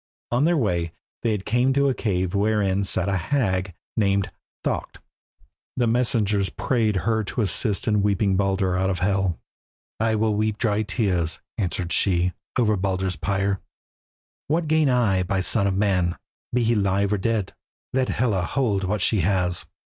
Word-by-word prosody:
On 125 Hz, +5 st, +2 dB
their 170 Hz, 0 st, +3 dB
way 85 Hz, -, 0 dB, 0.3 s
they 110 Hz, -3 st, +1 dB
came 120 Hz, +7 st, +1 dB
to 140 Hz, +1 st, +3 dB
a 135 Hz, -, +2 dB
cave 95 Hz, -6 st, -1 dB
wherein 100 Hz, -1 st, +1 dB
sat 95 Hz, -1 st, +1 dB
a 100 Hz, -1 st, +1 dB
hag 95 Hz, -, -1 dB, 0.2 s
named 100 Hz, -3 st, +1 dB, 0.3 s
Thaukt. -, -, -3 dB, 0.8 s
The 125 Hz, -, +2 dB
messengers 115 Hz, -5 st, +1 dB
prayed 110 Hz, +3 st, 0 dB
her 110 Hz, -1 st, +1 dB
to 115 Hz, -, -2 dB
assist 105 Hz, +2 st, 0 dB
in 105 Hz, -2 st, +3 dB
weeping 100 Hz, -1 st, +2 dB
Baldur 95 Hz, -1 st, +1 dB
out 95 Hz, +1 st, +1 dB
of 95 Hz, -, -1 dB
Hel. 95 Hz, -2 st, 0 dB, 0.6 s
"I 115 Hz, 0 st, +2 dB
will 110 Hz, 0 st, +1 dB
weep 105 Hz, 0 st, 0 dB
dry 105 Hz, -2 st, +1 dB
tears," 95 Hz, -, -1 dB, 0.2 s
answered 90 Hz, -3 st, -1 dB
she, 90 Hz, -2 st, +2 dB, 0.2 s
"over 110 Hz, -4 st, +3 dB
Baldur's 95 Hz, -1 st, -1 dB
pyre. 95 Hz, +2 st, -1 dB, 0.9 s
What 160 Hz, +2 st, 0 dB
gain 155 Hz, -2 st, +3 dB
I 115 Hz, -7 st, +2 dB
by 95 Hz, +2 st, -1 dB
the 95 Hz, -, 0 dB
son 100 Hz, +1 st, +2 dB
of 95 Hz, -1 st, 0 dB
man, 90 Hz, -4 st, +1 dB, 0.3 s
be 125 Hz, 0 st, +1 dB
he 115 Hz, +1 st, +2 dB
live 100 Hz, -1 st, +1 dB
or 105 Hz, -, 0 dB
dead? 110 Hz, -1 st, -1 dB, 0.4 s
Let 130 Hz, 0 st, +1 dB
Hela 110 Hz, -7 st, +1 dB
hold 100 Hz, +1 st, 0 dB
what 100 Hz, +1 st, -1 dB
she 110 Hz, -, +2 dB
has." 90 Hz, -1 st, +1 dB
100 Hz, 165 wpm, -24 LUFS, 95-115 Hz, 0.9 s, their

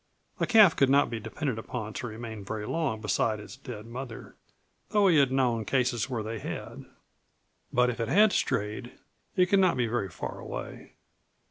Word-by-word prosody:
A -, -, +1 dB
calf 215 Hz, -7 st, +7 dB
could 135 Hz, -, +3 dB
not 140 Hz, -1 st, +4 dB
be 115 Hz, -, -3 dB
depended 130 Hz, +1 st, -3 dB
upon 110 Hz, -1 st, -5 dB
to 120 Hz, -, -4 dB
remain 110 Hz, -2 st, -7 dB
very 105 Hz, +1 st, -4 dB
long 135 Hz, -6 st, -1 dB
beside 110 Hz, 0 st, 0 dB
its 105 Hz, -, -10 dB
dead 120 Hz, -5 st, -9 dB
mother, 120 Hz, 0 st, -8 dB, 0.5 s
though 205 Hz, -1 st, +4 dB
he 170 Hz, -4 st, +5 dB
had 140 Hz, -3 st, +4 dB
known 125 Hz, -4 st, +1 dB
cases 125 Hz, 0 st, 0 dB
where 120 Hz, -4 st, -2 dB
they 110 Hz, +1 st, -5 dB
had. -, -, -6 dB, 0.9 s
But 125 Hz, 0 st, +3 dB
if 120 Hz, -, -8 dB
it 115 Hz, -, -1 dB
had 205 Hz, -, +5 dB
strayed 110 Hz, +4 st, -1 dB, 0.4 s
it 180 Hz, -2 st, +5 dB
could 195 Hz, +2 st, +3 dB
not 185 Hz, -7 st, +3 dB
be 125 Hz, -, +2 dB
very 110 Hz, -4 st, -1 dB
far 80 Hz, -, -6 dB
away. -, -, -7 dB
120 Hz, 185 wpm, -28 LUFS, 110-140 Hz, 0.9 s, calf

